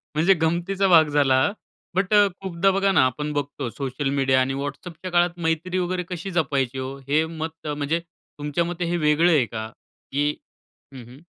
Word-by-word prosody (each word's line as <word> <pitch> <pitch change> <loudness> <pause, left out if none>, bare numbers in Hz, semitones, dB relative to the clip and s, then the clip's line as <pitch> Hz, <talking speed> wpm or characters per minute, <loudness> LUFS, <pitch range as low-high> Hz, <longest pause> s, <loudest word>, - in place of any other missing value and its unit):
म्हणजे 170 +5 +5
गमतीचा 175 +4 +1
भाग 160 -3 +6
झाला. 135 -3 +3 0.5
बट 190 +2 +1
अ, 205 -1 +6
खूपदा 190 0 +1
बघा 195 +1 +2
ना 180 - +4
आपण 150 +4 -2
बघतो 145 -3 -3
सोशल 135 +2 -3
मीडिया 135 -1 +3
आणि 135 +1 0
WhatsAppच्या 165 +5 -6
काळात 175 0 +2
मैत्री 165 +3 0
वगैरे 180 0 -1
कशी 180 +2 -5
जपायची 135 -6 0
हो? 130 +1 -5
हे 155 +3 +2
मत 160 0 -7
म्हणजे 145 +2 -1
तुमच्या 165 -2 -5
मते 175 0 -3
हे 175 +1 0
वेगळं 155 +4 +4
आहे 145 -6 +4
का? 110 -1 -5 0.4
की 145 +2 +1 0.7
हं, 125 - -9
हं. 120 +2 -14
160 Hz, 175 wpm, -23 LUFS, 140-175 Hz, 0.7 s, भाग